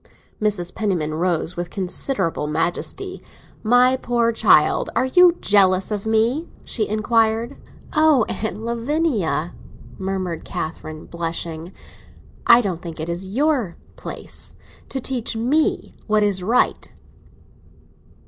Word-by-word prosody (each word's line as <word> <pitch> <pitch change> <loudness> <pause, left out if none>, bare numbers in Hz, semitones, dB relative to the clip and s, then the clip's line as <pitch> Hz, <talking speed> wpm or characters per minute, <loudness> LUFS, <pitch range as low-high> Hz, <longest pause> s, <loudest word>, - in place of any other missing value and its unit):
Mrs. 195 -5 -1
Penniman 175 -8 -1
rose 170 0 -1
with 175 0 -4
considerable 185 - -1
majesty. 175 - -2 0.4
"My 245 +3 +4
poor 240 -2 +1
child, 225 - +4
are - - +2
you 350 +6 +5
jealous 190 -1 +4
of 210 0 -3
me?" 230 +9 +1
she 215 -3 -2
inquired. 225 +3 +1 0.4
"Oh, 305 -7 +4
Aunt 220 0 -4
Lavinia!" 235 - -1 0.5
murmured 190 -3 -3
Catherine, 155 0 -6
blushing. 165 0 -4 0.8
"I 235 +1 +8
don't 185 -6 -3
think 165 -2 -8
it 160 +2 -4
is 175 +3 -4
your 250 - 0 0.2
place - - -8 0.3
to 270 - -3
teach 245 -3 -2
me 275 +8 +1
what 215 -1 +3
is 200 -3 +1
right." 225 +7 +1
210 Hz, 115 wpm, -21 LUFS, 175-245 Hz, 0.8 s, I